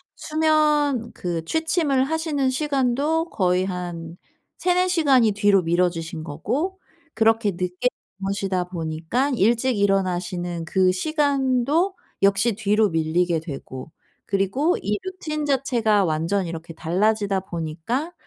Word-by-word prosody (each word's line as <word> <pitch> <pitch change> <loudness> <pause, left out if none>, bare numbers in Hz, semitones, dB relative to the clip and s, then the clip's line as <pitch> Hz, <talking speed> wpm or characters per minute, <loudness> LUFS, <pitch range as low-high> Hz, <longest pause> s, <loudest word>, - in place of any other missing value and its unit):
수면 300 -5 +1
그 170 -2 -4
취침을 320 - +1
하시는 300 -3 0
시간도 285 +3 0
거의 185 - +1
한 175 -2 -5 0.4
3-4 365 0 +2
시간이 270 - +4
뒤로 200 -1 +3
미뤄지신 170 -1 -1
거고 245 - -3 0.3
그렇게 225 -1 +3
늦게 180 +5 -2 0.3
주무시다 195 -2 -1
보니까 170 - -2
일찍 235 +2 +2
일어나시는 180 -3 0
그 185 +2 +3
시간도 285 - +1 0.3
역시 200 +4 +3
뒤로 210 0 +2
밀리게 165 +1 +1
되고. 140 -2 -8 0.4
그리고 200 - +1
이 205 +2 -1
루틴 315 -5 -4
자체가 235 -7 +2
완전 165 +4 0
이렇게 165 0 -7
달라지다 200 +4 0
보니까 180 - -4
205 Hz, 260 characters per minute, -23 LUFS, 180-280 Hz, 0.4 s, 시간이